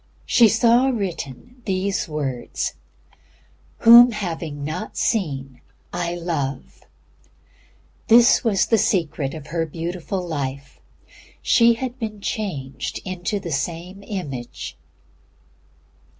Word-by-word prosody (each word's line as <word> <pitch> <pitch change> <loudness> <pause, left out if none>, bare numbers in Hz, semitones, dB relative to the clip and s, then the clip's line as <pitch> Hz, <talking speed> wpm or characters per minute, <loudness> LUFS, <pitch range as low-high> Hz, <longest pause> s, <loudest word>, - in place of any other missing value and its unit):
She 230 -2 +5
saw 235 +4 +4
written 205 - -4
these 190 -2 -1
words 135 -5 -3 1.1
"Whom 235 +1 +9
having 165 -7 -4
not 160 +8 -5
seen 135 - -1 0.3
I 175 0 -2
love." 140 - -4 1.2
That 240 +2 +6
was 215 -5 +2
the 225 - +3
secret 160 -7 0
of 155 -3 -8
her 165 0 -2
beautiful 175 +3 -4
life. 140 -3 -5 0.6
She 235 -1 +5
had 255 +1 -5
been 215 -3 -5
changed 175 -11 -4
into 185 +3 -3
the 170 -3 -6
Same 175 +6 -4
Image. 145 - -6
175 Hz, 100 wpm, -22 LUFS, 145-215 Hz, 1.2 s, Whom